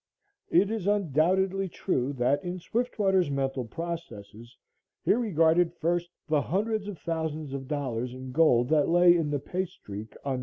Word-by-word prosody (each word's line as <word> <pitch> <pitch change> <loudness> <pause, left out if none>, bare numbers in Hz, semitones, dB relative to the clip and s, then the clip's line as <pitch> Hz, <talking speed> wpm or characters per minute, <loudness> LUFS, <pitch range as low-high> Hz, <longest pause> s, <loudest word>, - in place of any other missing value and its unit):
It 195 +5 +3
is 215 -4 -3
undoubtedly 190 +1 +1
true 140 -7 -1
that 130 +5 +1
in 180 0 -4
Swiftwater's 195 -4 0
mental 135 -2 -1
processes 120 -8 -7 0.5
he - - +4
regarded 175 -6 +2
first, 175 +1 -1 0.2
the 155 -2 +2
hundreds 210 +5 -1
of 205 -4 -6
thousands 160 -3 -3
of 135 -1 -5
dollars 125 -5 -2
in 130 0 -8
gold 125 -4 +4
that 155 -1 +3
lay 175 +1 +6
in 165 -3 0
the 145 - 0
pay 180 +7 -3
streak 105 - -10
on 135 -2 -1
No. - - -4
165 Hz, 160 wpm, -28 LUFS, 135-185 Hz, 0.5 s, lay